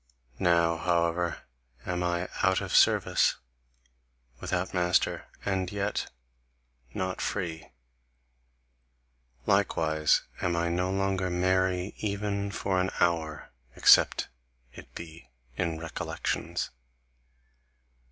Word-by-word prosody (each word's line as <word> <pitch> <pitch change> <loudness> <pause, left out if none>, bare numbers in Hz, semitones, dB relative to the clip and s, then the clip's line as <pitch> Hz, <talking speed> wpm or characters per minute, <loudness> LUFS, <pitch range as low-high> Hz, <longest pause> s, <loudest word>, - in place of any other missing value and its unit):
Now, 85 -2 +3
however, 85 -1 0 0.4
am 90 0 -2
I 90 0 -1
out 95 0 +3
of - - -3
service, - - +4 1.0
without 90 0 -2
master, 90 -1 +1 0.2
and 95 -2 -1
yet 100 0 -2 0.8
not 95 +6 -3
free; 85 -5 -3 1.8
likewise 80 -1 +2 0.2
am 85 -1 0
I 85 0 0
no 90 +2 0
longer 95 -1 0
merry 95 +1 +1
even 100 -1 -2
for 95 -2 0
an 95 - 0
hour, 80 -3 0 0.2
except - - +5 0.4
it - - -12
be 85 -1 -10 0.3
in 85 0 -1
recollections. 80 -1 -3
90 Hz, 95 wpm, -28 LUFS, 85-95 Hz, 1.8 s, except